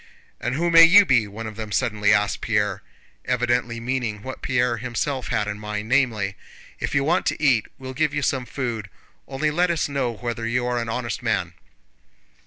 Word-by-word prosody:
"And 120 +2 -2
who 170 +3 0
may 165 0 +9
you 200 +5 +8
be?" 120 - +3
one 110 +3 -7
of 110 -1 -7
them 110 -2 -6
suddenly 105 -2 +1
asked 105 -2 +2
Pierre, 105 -2 0 0.4
evidently 120 -1 0
meaning 115 -4 -3
what 130 - -7
Pierre 125 -2 +1
himself 125 +3 -3
had 105 - -1
in 105 0 -4
mind, 105 0 -5
namely: 115 -7 +1 0.4
"If - - -3
you 140 - +3
want 170 +5 +1
to - - -1
eat 125 -7 +3
we'll 130 -1 -7
give 155 +2 +1
you 145 0 -2
some 130 -1 -1
food, 115 -7 -4 0.4
only 150 +3 -1
let 175 +3 +2
us 170 -2 0
know 140 -4 -1
whether 115 0 -4
you 125 +1 0
are 125 0 0
an 115 -1 -4
honest 115 +1 -3
man." - - -1
120 Hz, 195 wpm, -23 LUFS, 110-135 Hz, 0.4 s, may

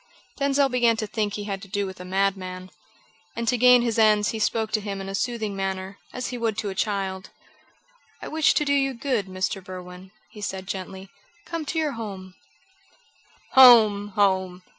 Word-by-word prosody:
Denzil 280 0 +2
began 240 -3 +2
to 220 - -2
think 210 -1 -2
he 210 - -5
had 195 -2 -5
to 200 - -11
do 200 +1 -2
with 190 -1 -8
a 180 - -8
madman, 185 -1 -2 0.6
and 235 0 -4
to 245 - +3
gain 250 0 +6
his 230 -2 -1
ends 210 -1 +4
he 225 - -3
spoke 220 +1 0
to 215 - 0
him 200 -1 -5
in 195 - -6
a 195 - -5
soothing 220 -1 -2
manner, 195 0 -4
as 250 - -4
he 245 - -5
would 225 -2 -1
to 210 - -2
a - - -5
child: 190 -2 -3 0.9
"I - - -8
wish 315 -1 +2
to 300 - +1
do 285 - +1
you 270 -2 +1
good, 235 -5 -1
Mr. 185 +1 -3
Berwin," 180 0 -10 0.3
said 190 -2 -4
he 190 - -4
gently. 190 0 -7 0.4
"Come 330 -2 -5
to 320 - -4
your 310 -2 +1
home." 195 -6 -7 1.2
"Home! 220 -6 +7
home! 190 -3 +1
205 Hz, 190 wpm, -24 LUFS, 190-235 Hz, 1.2 s, Home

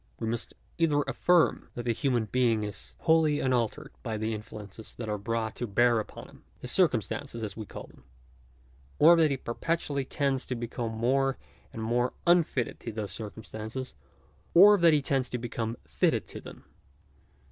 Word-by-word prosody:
We 115 - -3
must 115 +1 -3 0.2
either 150 -3 +3
affirm 175 +2 +2
that 120 - -4
the 120 -1 +1
human 125 -3 0
being 115 -2 +1
is 105 -1 -7
wholly 160 -2 +3
unaltered 125 -4 0
by 110 -3 -3
the 110 +1 -2
influences 105 0 -8
that 115 - -6
are 105 -1 -2
brought 110 +1 -2
to 120 - -3
bear 120 +3 +3
upon 110 - -7
him - - -18
— - - -34
his 125 - -4
circumstances 130 - 0
as 105 -3 -4
we 110 -2 -7
call - - -8
them; - - -17 0.9
or 165 +3 +8
that 160 -2 +4
he 140 - -1
perpetually 140 +3 -2
tends 135 0 -1
to 125 - -2
become 120 -1 -4
more 130 +4 +1 0.3
and 110 - -6
more 120 +2 +1
unfitted 170 -8 +2
to 115 - -6
those 105 -2 -4
circumstances; 110 +3 -6 0.6
or 205 +4 +9
that 170 -2 +6
he 145 -2 +2
tends 130 -2 0
to 125 - -2
become 115 -1 -4
fitted - - +1
to - - -8
them. - - -12
120 Hz, 175 wpm, -29 LUFS, 110-140 Hz, 0.9 s, or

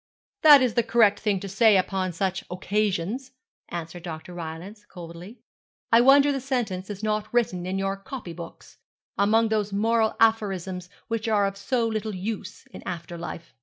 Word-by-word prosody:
'That 295 -4 +9
is 245 -3 +1
the 235 - +3
correct 220 -4 +3
thing 205 -3 0
to 200 - -6
say 210 +1 +4
upon 185 0 -1
such 190 +2 -2
occasions, 210 +6 -2 0.4
answered 170 0 -6
Dr. 165 +1 -8
Rylance, 175 +5 -8
coldly; 175 +3 -11 0.5
'I 230 +1 +7
wonder 275 +3 +6
the 270 -1 -2
sentence 225 -8 -2
is 205 0 -7
not 215 -1 -1
written 185 -7 0
in 190 +1 -2
your 195 0 -1
copy 195 -3 -8
books, 170 0 -11 0.4
among 220 +3 +3
those 210 -2 0
moral 220 +2 +1
aphorisms 195 -5 +1 0.2
which 230 0 -2
are 210 -2 +3
of 195 0 -2
so 230 +4 0
little 215 -2 -3
use 205 +1 -5
in - - -10
after 175 -1 -6
life.' 170 0 -8
205 Hz, 165 wpm, -25 LUFS, 185-225 Hz, 0.5 s, That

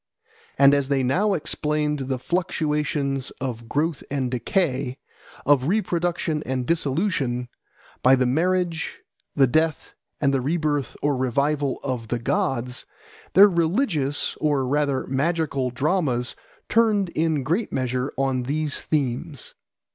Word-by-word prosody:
And 140 0 +7
as 140 -1 +2
they 135 -1 +1
now 190 +11 +2
explained 150 -1 -1
the 130 -1 -1
fluctuations 150 -3 -1
of 120 -3 -5
growth 155 +1 -1
and 135 -3 -1
decay, 130 - 0 0.5
of 140 -2 +4
reproduction 175 -5 0
and 130 -1 -2
dissolution, 140 -5 0 0.5
by 130 +1 +6
the 130 -1 +1
marriage, 170 +4 0 0.4
the 140 - +6
death, 155 +4 0 0.3
and 140 -2 +2
the 135 - +1
rebirth 145 -2 -1
or 145 -1 +2
revival 140 +2 0
of 125 -5 -3
the 120 - -1
gods, 125 - -1 0.5
their 200 +2 +9
religious 170 - 0
or 145 -4 +1
rather 140 0 0
magical 140 -1 0
dramas 130 -2 0 0.3
turned 215 -5 +3
in 160 -4 0
great 180 - -1
measure 130 +1 -1
on 135 -1 +1
these 145 +3 -1
themes. 140 -1 -2
145 Hz, 125 wpm, -24 LUFS, 130-165 Hz, 0.5 s, their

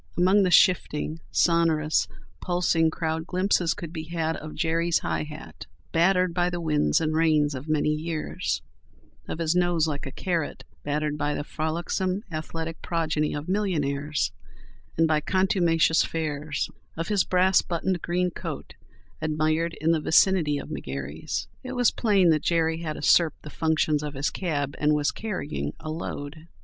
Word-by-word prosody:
Among 190 +3 +5
the 185 - +3
shifting, 165 -3 +3
sonorous, 165 -3 +2 0.3
pulsing 175 -2 +2
crowd 160 0 -3
glimpses 185 -2 +1
could 170 -1 -7
be 160 -2 -5
had 165 -1 -2
of 155 0 -8
Jerry's 165 0 +1
high 80 -1 -1
hat, - - -10 0.2
battered 180 +1 +3
by 175 0 +1
the 175 0 -3
winds 155 0 +2
and 155 -1 0
rains 155 -2 +3
of 135 +3 -7
many 150 0 +2
years; 155 0 -3 0.6
of - - -4
his 165 -1 +1
nose 175 -3 +2
like 145 -2 -3
a - - -6
carrot, 170 -1 -2 0.2
battered 150 +1 -1
by 145 0 0
the - - -3
frolicsome, 175 +6 -2
athletic 160 +1 -5
progeny 155 -3 -1
of 145 +1 -5
millionaires 150 -7 0 0.7
and 165 0 +4
by 155 -1 +2
contumacious 175 -2 +3
fares; 150 -2 -2 0.3
of 165 +3 -3
his 205 -3 +3
brass 185 +1 +3
buttoned 175 +1 -2
green 180 +1 0
coat, - - -6 0.5
admired 155 +2 0
in 160 +2 +2
the 160 -2 +1
vicinity 160 -2 +3
of - - -7
McGary's. 70 +3 -4 0.2
It 255 0 -5
was 245 -2 +3
plain 195 -7 +3
that 155 -2 +2
Jerry 165 -1 +1
had 155 -2 -3
usurped 160 +2 +3
the 150 - -9
functions 155 -2 +1
of 150 -1 -5
his 135 +2 -1
cab, 145 -6 -2
and 150 0 +3
was 145 -1 +1
carrying 75 - -4
a 155 - -5
"load." 155 0 -6
160 Hz, 160 wpm, -26 LUFS, 150-175 Hz, 0.7 s, Among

